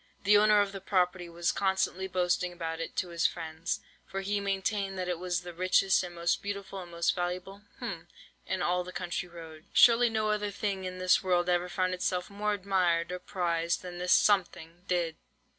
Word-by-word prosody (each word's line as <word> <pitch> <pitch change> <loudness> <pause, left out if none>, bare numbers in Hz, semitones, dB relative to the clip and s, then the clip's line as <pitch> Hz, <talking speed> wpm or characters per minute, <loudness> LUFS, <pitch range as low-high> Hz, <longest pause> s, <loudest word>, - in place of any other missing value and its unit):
The 205 +1 +5
owner 210 0 +6
of 200 -1 -1
the 195 -1 -7
property 180 -2 0
was 170 0 0
constantly 190 -1 0
boasting 180 -1 0
about 165 -2 -5
it 165 - -5
to 180 - -1
his 170 -1 +2
friends, 160 -1 -4 0.3
for 195 - -4
he 205 +1 -1
maintained 195 0 -1
that 185 -1 -2
it 180 -2 -2
was 180 -1 -1
the 175 -1 -8
richest, 185 +2 +3
and 175 -1 -7
most 170 0 0
beautiful, 200 -1 -5
and 175 - -10
most 170 0 +1
valuable—hm—in 195 - -6
all 180 +1 +1
the 180 - -8
country 180 0 -4
round. 160 -2 -11
Surely 240 0 +6
no 220 -1 0
other 210 -1 -1
thing 200 -2 -3
in 185 0 -5
this 185 0 +3
world 180 -1 +2
ever 175 0 +1
found 185 0 0
itself 180 +1 -2
more 210 +1 -1
admired 180 -4 +1
or 180 - -4
prized 170 -2 -1
than 175 -1 -7
this 180 0 -1
something 175 -3 +2
did. 170 -3 0
180 Hz, 190 wpm, -30 LUFS, 175-195 Hz, 0.3 s, owner